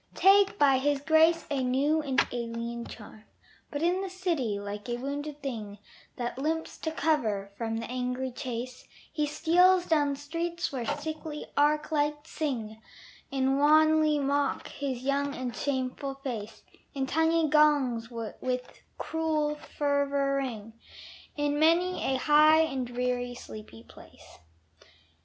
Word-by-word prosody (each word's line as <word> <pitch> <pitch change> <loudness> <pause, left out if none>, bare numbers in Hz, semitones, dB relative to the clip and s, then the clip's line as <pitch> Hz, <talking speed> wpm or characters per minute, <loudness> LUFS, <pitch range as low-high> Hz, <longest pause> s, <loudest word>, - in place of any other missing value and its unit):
Take 395 +1 +5
by 275 -2 +4
his 285 +1 +1
grace 320 +3 +4
a 275 -2 0
new 280 +5 +2
and 275 -3 0
alien 235 0 -4
charm. 215 0 -12 0.4
But 290 +1 -4
in 360 +2 +2
the 390 - -4
city, 335 - -1
like 205 +2 -6
a 240 - -1
wounded 285 +3 -5
thing 215 -7 -5 0.4
That 240 +1 -4
limps 320 +3 -2
to 320 - -3
cover 220 -12 0
from 225 0 -3
the 230 - -4
angry 250 +1 -3
chase, 250 0 -6 0.3
He 300 -1 0
steals 355 +4 +4
down 290 -4 +2
streets 335 +4 -3
where 250 -4 -4
sickly 300 +1 -4
arc 300 +2 +2
lights 295 0 -1
sing, 225 -8 -3 0.5
And 270 0 +1
wanly 310 +1 +5
mock 280 0 0
his 265 -3 -4
young 280 +1 0
and 250 -2 -4
shameful 270 0 -2
face; 225 -6 -6 0.3
And 270 -1 -1
tiny 320 +2 +2
gongs 285 -6 +3
with 250 +2 -5 0.2
cruel 315 -2 -1
fervor 285 -2 0
ring 225 -5 -4 0.6
In 290 0 0
many 340 +4 +3
a 265 - +1
high 305 +3 +6
and 270 -6 -1
dreary 245 0 -2
sleeping 215 - -11
place. - - -16
280 Hz, 135 wpm, -28 LUFS, 250-310 Hz, 0.6 s, high